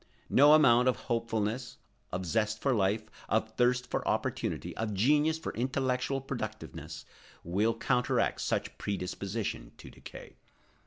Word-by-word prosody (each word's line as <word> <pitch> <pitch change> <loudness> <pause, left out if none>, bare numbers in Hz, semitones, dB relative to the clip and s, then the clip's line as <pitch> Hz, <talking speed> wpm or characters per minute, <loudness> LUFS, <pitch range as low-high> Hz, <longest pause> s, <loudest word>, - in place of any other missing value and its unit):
No 145 +3 +7
amount 125 -5 +5
of 130 - +3 0.2
hopefulness, 115 +1 -1 0.3
of 90 +1 -3
zest 110 +3 0
for 135 +2 +1
life, 105 0 +1 0.3
of 110 0 0
thirst 125 0 +2
for - - -2
opportunity, - - -2
of 110 -2 -3
genius 150 +9 +3
for 160 - -5
intellectual 130 +2 -1
productiveness 115 -5 -6 0.4
will 105 +7 0
counteract 125 +1 +1
such - - -2
predisposition 100 +2 -4
to - - -12
decay. - - -12
115 Hz, 125 wpm, -30 LUFS, 105-130 Hz, 0.4 s, No